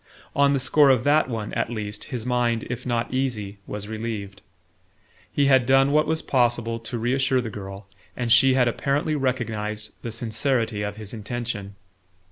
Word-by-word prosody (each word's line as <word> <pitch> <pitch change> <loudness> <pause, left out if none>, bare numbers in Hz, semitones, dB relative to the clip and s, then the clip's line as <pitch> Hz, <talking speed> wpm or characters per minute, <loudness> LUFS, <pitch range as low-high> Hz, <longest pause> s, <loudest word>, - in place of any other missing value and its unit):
On 140 0 +4
the 140 - +1
score 140 +2 +5
of 130 -3 +4
that 145 0 +3
one, 110 -3 -4
at - - -1
least, 105 -3 -5
his 120 -3 -5
mind, 120 -2 +1
if 125 +1 -5
not 120 0 -1
easy, 110 -7 -2
was 105 0 -5
relieved. 110 -3 -5 0.9
He 145 - +2
had 130 -3 +4
done 135 +1 +5
what 150 +1 +3
was 160 0 -1
possible 120 -2 +1
to 115 +1 -5
reassure 130 +3 +1
the 115 -3 -4
girl, 100 0 -8 0.3
and 120 -2 -1
she 130 +2 +6
had 125 -2 +4
apparently 140 +6 0
recognized 110 -6 -2
the 115 - -5
sincerity 115 -1 0
of 105 0 -4
his 105 -1 -8
intention. 110 -2 -5
120 Hz, 170 wpm, -24 LUFS, 110-130 Hz, 0.9 s, she